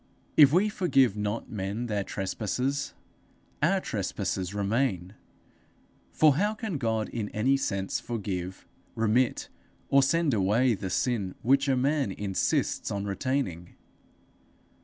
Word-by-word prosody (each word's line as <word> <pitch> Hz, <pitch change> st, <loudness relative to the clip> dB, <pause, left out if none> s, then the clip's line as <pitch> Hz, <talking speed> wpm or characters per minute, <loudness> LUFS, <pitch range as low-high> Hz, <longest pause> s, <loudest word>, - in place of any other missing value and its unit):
If 145 Hz, -3 st, +8 dB
we 185 Hz, +6 st, +4 dB
forgive 135 Hz, -, +2 dB
not 105 Hz, +2 st, -3 dB
men 105 Hz, +3 st, -3 dB
their 105 Hz, -4 st, -1 dB
trespasses, 120 Hz, +9 st, -2 dB, 0.7 s
our 185 Hz, +6 st, +3 dB
trespasses 95 Hz, -, -3 dB
remain. 100 Hz, -2 st, -1 dB, 1.0 s
For 150 Hz, -3 st, +4 dB
how 210 Hz, +4 st, +1 dB
can 215 Hz, -, -4 dB
God 110 Hz, -3 st, 0 dB
in 110 Hz, -3 st, -4 dB
any 130 Hz, +6 st, +2 dB
sense 100 Hz, -8 st, -2 dB
forgive, 95 Hz, -5 st, -5 dB, 0.3 s
remit, 115 Hz, +3 st, +1 dB, 0.4 s
or 140 Hz, -, +5 dB
send 165 Hz, +1 st, +2 dB
away 110 Hz, +5 st, +3 dB
the 95 Hz, -2 st, -4 dB
sin 100 Hz, -2 st, -1 dB
which 135 Hz, +3 st, +3 dB
a 135 Hz, -2 st, +2 dB
man 140 Hz, -3 st, +1 dB
insists 95 Hz, -1 st, -1 dB
on 100 Hz, 0 st, -3 dB
retaining? 100 Hz, -5 st, -2 dB
115 Hz, 120 wpm, -28 LUFS, 100-135 Hz, 1.0 s, If